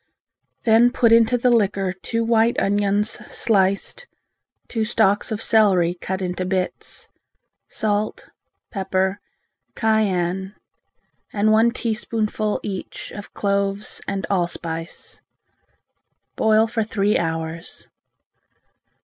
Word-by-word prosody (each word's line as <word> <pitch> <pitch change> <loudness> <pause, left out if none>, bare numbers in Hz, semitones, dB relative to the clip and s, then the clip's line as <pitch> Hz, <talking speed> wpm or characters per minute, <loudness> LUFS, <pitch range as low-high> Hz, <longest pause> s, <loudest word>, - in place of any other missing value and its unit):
Then 230 +1 +5
put 240 -3 +3
into 230 +2 +5
the 245 +1 +2
liquor 195 -4 +1
two 230 +5 -3
white 230 0 +2
onions 205 +2 +1 0.2
sliced, 200 - 0 0.6
two 225 -2 -1
stalks 215 -1 +1
of 220 0 -2
celery 190 -6 +4
cut 190 +1 -4
into 180 0 -2
bits, 185 0 -3 0.6
salt, 210 -1 -2 0.4
pepper, 190 -1 -1 0.6
cayenne, 190 -3 0 0.8
and 215 +1 +2
one 220 +2 +5
teaspoonful 220 -2 -2
each 195 -3 -6
of 205 - -10
cloves 200 0 -1
and 195 -2 -2
allspice. 170 -3 -4 1.1
Boil 220 0 +4
for 225 0 -2
three 210 -1 0
hours. 165 0 -4
205 Hz, 100 wpm, -22 LUFS, 190-220 Hz, 1.1 s, Then